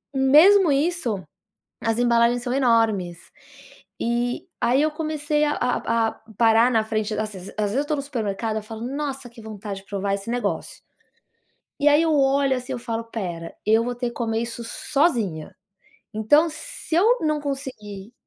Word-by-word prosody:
hum, 265 Hz, 0 st, +2 dB
mesmo 365 Hz, +2 st, +7 dB
isso, 275 Hz, -, 0 dB, 0.6 s
as 225 Hz, 0 st, 0 dB
embalagens 240 Hz, 0 st, +3 dB
são 250 Hz, 0 st, -2 dB
enormes. 225 Hz, -9 st, +2 dB, 0.9 s
E 240 Hz, +1 st, -1 dB
aí 255 Hz, +4 st, +3 dB
eu 310 Hz, -, +2 dB
comecei 300 Hz, -1 st, -1 dB
a 295 Hz, -, +1 dB
a 230 Hz, -2 st, 0 dB
a -, -, -7 dB, 0.3 s
parar 230 Hz, +1 st, +5 dB
na 225 Hz, -2 st, +2 dB
frente 215 Hz, -1 st, -2 dB
das 215 Hz, 0 st, -2 dB
ses 190 Hz, -1 st, -9 dB
às 210 Hz, -1 st, 0 dB
vezes 245 Hz, -, -1 dB
eu 285 Hz, -, +1 dB
tô 305 Hz, -, 0 dB
no 280 Hz, -, -1 dB
supermercado 220 Hz, -5 st, -3 dB
eu 215 Hz, -, -4 dB
falo: 220 Hz, +1 st, -8 dB
"Nossa! 270 Hz, 0 st, -4 dB
Que 230 Hz, -1 st, -14 dB
vontade 205 Hz, -2 st, -7 dB
de -, -, -26 dB
provar 200 Hz, 0 st, -2 dB
esse 200 Hz, +1 st, -9 dB
negócio." 245 Hz, 0 st, -3 dB, 1.0 s
E 285 Hz, -, +1 dB
aí 295 Hz, +2 st, +5 dB
eu 325 Hz, -1 st, +2 dB
olho 275 Hz, -1 st, +3 dB
assim, 250 Hz, +1 st, -5 dB
eu 255 Hz, -, -3 dB
falo: 230 Hz, -1 st, -3 dB
"Espera, 180 Hz, -8 st, -6 dB
eu 225 Hz, +2 st, +4 dB
vou 245 Hz, -, -2 dB
ter 245 Hz, 0 st, -2 dB
que 235 Hz, -, -9 dB
comer 225 Hz, -1 st, -1 dB
isso 235 Hz, 0 st, -6 dB
sozinha. 230 Hz, -, -1 dB, 0.6 s
Então, 290 Hz, +10 st, +4 dB
se 330 Hz, +1 st, -7 dB
eu 460 Hz, +7 st, +4 dB
não 305 Hz, -1 st, +1 dB
conseguir, 235 Hz, -7 st, -6 dB
240 Hz, 175 wpm, -23 LUFS, 220-280 Hz, 1.0 s, mesmo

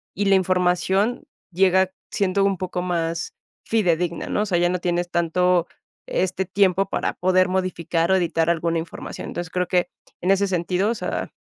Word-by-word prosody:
y 205 Hz, -, -1 dB
la 195 Hz, 0 st, +5 dB
información 185 Hz, -, +1 dB, 0.3 s
llega 190 Hz, 0 st, +3 dB, 0.2 s
siendo 195 Hz, 0 st, +1 dB
un 195 Hz, -1 st, +1 dB
poco 180 Hz, 0 st, -3 dB
más 170 Hz, -2 st, -2 dB, 0.3 s
fidedigna, 175 Hz, -6 st, 0 dB
¿no?, -, -, 0 dB
o -, -, +1 dB
sea, 185 Hz, -4 st, 0 dB
ya 175 Hz, 0 st, +3 dB
no 180 Hz, 0 st, -1 dB
tienes 175 Hz, 0 st, -1 dB
tanto 175 Hz, +1 st, +2 dB, 0.4 s
este 190 Hz, +1 st, -1 dB
tiempo 195 Hz, 0 st, +2 dB
para -, -, -1 dB
poder 185 Hz, 0 st, +2 dB
modificar 175 Hz, -2 st, -1 dB
o -, -, +5 dB
editar 170 Hz, -2 st, +1 dB
alguna 170 Hz, 0 st, +1 dB
información, 165 Hz, -, -7 dB
entonces, 175 Hz, -1 st, -5 dB
creo 180 Hz, -1 st, -1 dB
que 180 Hz, -1 st, +1 dB, 0.3 s
en 185 Hz, +2 st, +2 dB
ese 200 Hz, +1 st, +3 dB
sentido, 180 Hz, +2 st, 0 dB
o -, -, -2 dB
sea, -, -, -4 dB
180 Hz, 175 wpm, -23 LUFS, 175-190 Hz, 0.4 s, la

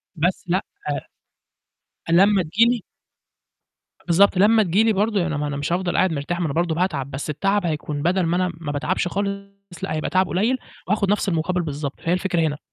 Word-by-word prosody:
بس 175 Hz, +4 st, 0 dB
لأ 185 Hz, +3 st, 0 dB, 1.5 s
أ -, -, +1 dB
لمّا 195 Hz, +2 st, +5 dB
تيجي 195 Hz, +9 st, +3 dB
لي 240 Hz, -4 st, -1 dB, 1.2 s
بالضبط. 190 Hz, +3 st, +4 dB
لمّا 215 Hz, +3 st, +5 dB
تيجي 190 Hz, +3 st, +2 dB
لي 225 Hz, -, +4 dB
برضه 205 Hz, 0 st, +1 dB
يعني 165 Hz, -4 st, -1 dB
ما 150 Hz, -, -1 dB
أنا 145 Hz, -1 st, -3 dB
مش 145 Hz, +3 st, -2 dB
هافضَل 175 Hz, 0 st, 0 dB
قاعد 185 Hz, -3 st, +3 dB
مرتاح، 160 Hz, +5 st, -3 dB
ما 170 Hz, -, +1 dB
أنا 140 Hz, -, -3 dB
برضه 170 Hz, -1 st, +1 dB
باتعب، 155 Hz, -6 st, -1 dB
بس 140 Hz, +3 st, -4 dB
التعب 195 Hz, +5 st, 0 dB
هيكون 150 Hz, -2 st, -3 dB
بَدَل 185 Hz, +3 st, +2 dB
ما 170 Hz, +1 st, +1 dB
أنا 185 Hz, 0 st, +1 dB
ما 150 Hz, -3 st, -4 dB
باتعبش 170 Hz, +5 st, -1 dB
خالص، 200 Hz, +1 st, -3 dB, 0.4 s
لأ، -, -, -3 dB
هيبقى 155 Hz, -, -2 dB
تَعَبْ 185 Hz, +2 st, +2 dB
قليّل 220 Hz, +8 st, +1 dB, 0.3 s
وهاخد 200 Hz, -1 st, +1 dB
نفْس 205 Hz, -1 st, +1 dB
المقابل 180 Hz, +1 st, 0 dB
بالضبط، 145 Hz, -2 st, -5 dB
فهي 165 Hz, -, -1 dB
الفكرة 180 Hz, -2 st, 0 dB
هنا. 150 Hz, -2 st, 0 dB
175 Hz, 200 wpm, -22 LUFS, 155-195 Hz, 1.5 s, لمّا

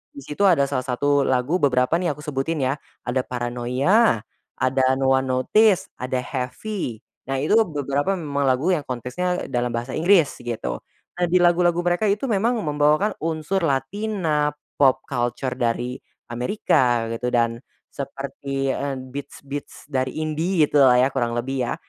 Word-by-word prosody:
di 280 Hz, -, -8 dB
situ 195 Hz, +7 st, +1 dB
ada 165 Hz, -7 st, +4 dB
salah 130 Hz, -2 st, -2 dB
satu 140 Hz, +2 st, +1 dB
lagu 130 Hz, +8 st, +1 dB
beberapa 125 Hz, -2 st, +2 dB
nih 175 Hz, -5 st, -1 dB
aku 150 Hz, -, -12 dB
sebutin 150 Hz, +1 st, -2 dB
ya. 135 Hz, +2 st, 0 dB, 0.2 s
Ada 125 Hz, +2 st, -1 dB
Paranoia, 125 Hz, -, +1 dB, 0.3 s
ada 130 Hz, +1 st, +1 dB
No 135 Hz, 0 st, +1 dB
One 130 Hz, 0 st, +2 dB
Notice, 185 Hz, +11 st, +3 dB
ada 125 Hz, 0 st, -2 dB
Heavy. 130 Hz, -, -4 dB, 0.2 s
Nah 135 Hz, -, -1 dB
itu 155 Hz, -, -1 dB, 0.2 s
beberapa 145 Hz, +4 st, -1 dB
memang 145 Hz, -5 st, -2 dB
lagu 130 Hz, +8 st, +2 dB
yang 155 Hz, -6 st, -1 dB
konteksnya 130 Hz, +9 st, -2 dB
dalam 120 Hz, -1 st, -1 dB
bahasa 120 Hz, +3 st, -4 dB
Inggris 170 Hz, -2 st, +3 dB
gitu. 110 Hz, -, -4 dB, 0.4 s
Nah 175 Hz, -, +3 dB
dilagu-lagu 175 Hz, 0 st, +3 dB
mereka 175 Hz, +4 st, +1 dB
itu 205 Hz, +5 st, 0 dB
memang 225 Hz, +4 st, +2 dB
membawakan 150 Hz, +7 st, +2 dB
unsur 160 Hz, +4 st, -1 dB, 1.2 s
pop 130 Hz, -1 st, +4 dB
culture 120 Hz, 0 st, -2 dB
dari 120 Hz, +1 st, -1 dB, 0.3 s
Amerika 125 Hz, -, +1 dB
gitu, 115 Hz, +2 st, -3 dB
dan 115 Hz, -1 st, +1 dB, 0.3 s
seperti, 140 Hz, 0 st, -4 dB
eee, 140 Hz, 0 st, -2 dB
beats-beats 140 Hz, +2 st, -8 dB
dari 130 Hz, -1 st, -1 dB
indie 160 Hz, +2 st, +1 dB
gitulah 135 Hz, -4 st, +5 dB
ya 130 Hz, -, +5 dB
kurang 120 Hz, -3 st, -1 dB
lebih 130 Hz, +3 st, -2 dB
ya. 120 Hz, -, -1 dB
135 Hz, 145 wpm, -23 LUFS, 125-165 Hz, 1.2 s, gitulah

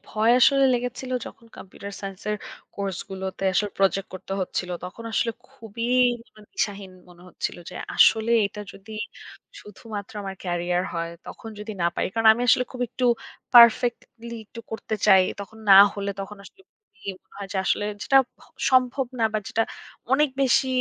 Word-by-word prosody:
ভয় 220 Hz, +2 st, +2 dB
আসলে 275 Hz, +1 st, +5 dB
লেগেছিল 250 Hz, +1 st, -4 dB, 0.2 s
যখন 230 Hz, -, -12 dB
কম্পিউটার 200 Hz, +1 st, -10 dB
সায়েন্সের 195 Hz, +1 st, -4 dB, 0.4 s
কোর্স 195 Hz, -2 st, -3 dB
গুলোতে 190 Hz, 0 st, -5 dB
আসলে 205 Hz, +2 st, +1 dB
প্রজেক্ট 195 Hz, 0 st, +1 dB
করতে 185 Hz, -, -7 dB
হচ্ছিল। 180 Hz, -1 st, -3 dB
তখন 200 Hz, +6 st, -9 dB
আসলে 230 Hz, +1 st, +1 dB, 0.2 s
খুবই 230 Hz, -3 st, -6 dB, 0.4 s
জিবনে 215 Hz, -3 st, -20 dB
দিশাহীন 195 Hz, -1 st, -3 dB, 0.2 s
মনে 175 Hz, 0 st, -17 dB
হচ্ছিল -, -, -4 dB
যে, -, -, -11 dB, 0.2 s
আসলে 225 Hz, +1 st, +5 dB, 0.2 s
এটা 210 Hz, +1 st, -9 dB
যদি 210 Hz, +3 st, -13 dB, 0.7 s
শুধুমাত্র 210 Hz, 0 st, -9 dB
আমার 195 Hz, -1 st, -5 dB
ক্যারিয়ার 175 Hz, 0 st, 0 dB
হয়, 165 Hz, 0 st, -3 dB, 0.2 s
তখন 225 Hz, -, -9 dB
যদি 210 Hz, +1 st, -6 dB
না -, -, +3 dB
পারি? -, -, 0 dB
কারণ 225 Hz, -1 st, +1 dB
আমি 240 Hz, +2 st, -3 dB
আসলে 250 Hz, -, +5 dB
খুব 255 Hz, -, -8 dB
একটু 255 Hz, -, -3 dB, 0.5 s
পারফেক্টলি 235 Hz, 0 st, +5 dB
একটু 230 Hz, -, -10 dB
করতে 220 Hz, 0 st, -4 dB
চাই। 190 Hz, -1 st, +7 dB, 0.2 s
তখন 220 Hz, +2 st, -10 dB
না -, -, +11 dB, 0.2 s
হলে, 200 Hz, 0 st, -3 dB
তখন 200 Hz, +2 st, -7 dB
আসলে 385 Hz, -, -16 dB
মনে 205 Hz, -, -10 dB, 0.3 s
হয় 200 Hz, -1 st, -6 dB
যে -, -, -3 dB
আসলে 205 Hz, -, +1 dB, 0.2 s
যেটা 270 Hz, -, +3 dB, 0.2 s
ভ -, -, -29 dB, 0.3 s
সম্ভব 255 Hz, 0 st, +3 dB
না 225 Hz, -, +2 dB
বা 215 Hz, -, +1 dB
যেটা 225 Hz, -, +1 dB, 0.5 s
অনেক 300 Hz, +2 st, +4 dB
বেশি 265 Hz, 0 st, +3 dB
210 Hz, 165 wpm, -24 LUFS, 195-235 Hz, 0.7 s, না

